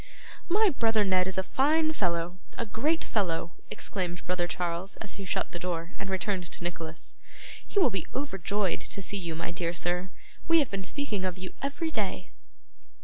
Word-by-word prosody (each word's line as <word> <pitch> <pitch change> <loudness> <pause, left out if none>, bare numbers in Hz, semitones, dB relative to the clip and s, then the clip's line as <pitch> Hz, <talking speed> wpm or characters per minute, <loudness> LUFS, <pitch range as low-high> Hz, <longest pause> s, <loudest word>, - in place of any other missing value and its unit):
'My 410 +2 +5
brother 225 -4 +3
Ned 185 -2 +4
is 190 - 0
a 190 - +3
fine 310 - +3
fellow, 175 - 0 0.2
a 235 - 0
great 295 +10 +1
fellow!' 175 -5 0 0.2
exclaimed 175 -3 -2
brother 175 -1 +1
Charles 175 +1 -2
as 210 - -7
he 195 - -5
shut 185 - 0
the 175 - -4
door 170 -1 -2
and 200 - -3
returned 190 -1 0
to 170 - -6
Nicholas. 165 -2 -4 0.5
'He - - -7
will 355 -11 +6
be 190 -4 -2
overjoyed 205 - 0
to 195 - -4
see 200 - -2
you, 170 -4 -2
my 165 - -2
dear 170 0 -1
sir. 180 +2 0 0.4
We 330 +1 +7
have 290 -6 +3
been 195 -1 -2
speaking 250 -9 -1
of 185 -1 -1
you 185 0 -6
every 320 +4 -1
day. 210 -8 -1
190 Hz, 185 wpm, -30 LUFS, 175-230 Hz, 0.5 s, We